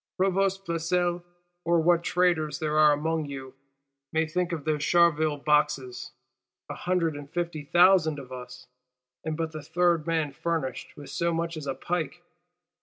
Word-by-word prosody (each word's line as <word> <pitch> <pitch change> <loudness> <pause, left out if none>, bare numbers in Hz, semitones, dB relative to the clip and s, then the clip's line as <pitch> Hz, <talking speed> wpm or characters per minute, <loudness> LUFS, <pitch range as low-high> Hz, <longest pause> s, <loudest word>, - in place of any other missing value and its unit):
Provost 195 +1 +1
Flesselles, 175 +1 0 0.4
or 170 0 +3
what 170 +1 +3
traitors 165 -6 +1
there 155 -1 -2
are 150 -1 +7
among 160 +1 -1
you, 135 -2 -8 0.6
may 160 0 +1
think 180 +2 -2
of 160 -4 -4
those 150 -2 0
Charleville 155 -2 +3
Boxes. 140 -4 0 0.6
A - - -3
hundred 175 -4 0
and 145 -1 -9
fifty 170 -2 -3
thousand 175 -2 +5
of 130 -2 -10
us; 125 0 -9 0.6
and 160 -1 -3
but 165 -1 -2
the 155 -1 -7
third 170 +1 +1
man 160 -3 0
furnished 160 -3 -3
with 145 -1 -10
so 170 0 0
much 165 0 -2
as 155 -2 -7
a 135 - -2
pike! 175 -1 -3
160 Hz, 160 wpm, -27 LUFS, 150-175 Hz, 0.6 s, are